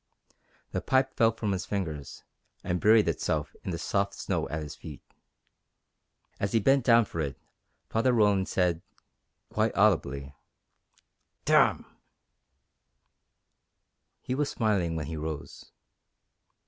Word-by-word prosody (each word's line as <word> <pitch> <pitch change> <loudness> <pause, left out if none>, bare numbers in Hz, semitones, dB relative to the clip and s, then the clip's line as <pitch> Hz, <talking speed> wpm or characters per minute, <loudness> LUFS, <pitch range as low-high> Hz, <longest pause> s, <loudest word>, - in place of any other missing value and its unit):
The - - -2
pipe 130 0 +1
fell 115 -1 +4
from 110 -2 -3
his 95 -1 -3
fingers 80 -9 -4 0.4
and 90 0 -2
buried 110 -1 +5
itself 75 -1 -1
in - - -5
the 85 - -2
soft 100 +3 -1
snow - - -2
at 75 0 -3
his 75 - -7
feet. - - -10 1.4
As 100 - -2
he 115 - +4
bent 135 +5 +3
down 115 -2 +5
for 85 - -7
it 70 -2 -3 0.5
Father 115 +3 +2
Roland 105 -5 +3
said 90 -3 +1 0.7
quite 110 0 0
audibly: 70 -10 +2 1.1
"Damn!" - - +4 2.4
He 125 - -3
was 140 +2 0
smiling 100 -7 0
when 80 -2 -3
he 80 +2 -5
rose. 75 -2 -7
95 Hz, 120 wpm, -28 LUFS, 80-115 Hz, 2.4 s, buried